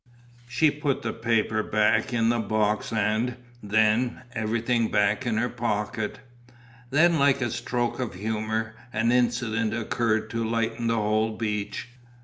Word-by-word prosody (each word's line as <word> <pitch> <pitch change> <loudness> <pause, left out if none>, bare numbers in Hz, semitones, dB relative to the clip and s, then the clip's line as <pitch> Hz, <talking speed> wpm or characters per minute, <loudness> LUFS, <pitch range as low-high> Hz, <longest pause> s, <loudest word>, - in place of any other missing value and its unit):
She 130 +6 +3
put 145 -2 -2
the - - -2
paper 110 -1 +1
back 105 +2 +2
in 115 -1 +2
the 120 0 +2
box 105 0 0
and, 110 +3 0 0.2
then, 110 +4 +2
everything 115 +1 0
back 105 +5 +1
in 110 -2 0
her 120 +2 +1
pocket. 110 -2 -2 0.7
Then, 160 +4 +4
like 140 -1 +4
a 120 -3 -1
stroke 120 0 -2
of 125 -7 -3
humour, 110 +2 -2 0.2
an 115 +2 +1
incident 120 -3 +1
occurred 110 -1 0
to 115 0 -1
lighten 115 +1 -1
the 115 - +2
whole 110 0 0
beach. 105 +1 -3
115 Hz, 140 wpm, -26 LUFS, 110-120 Hz, 0.7 s, Then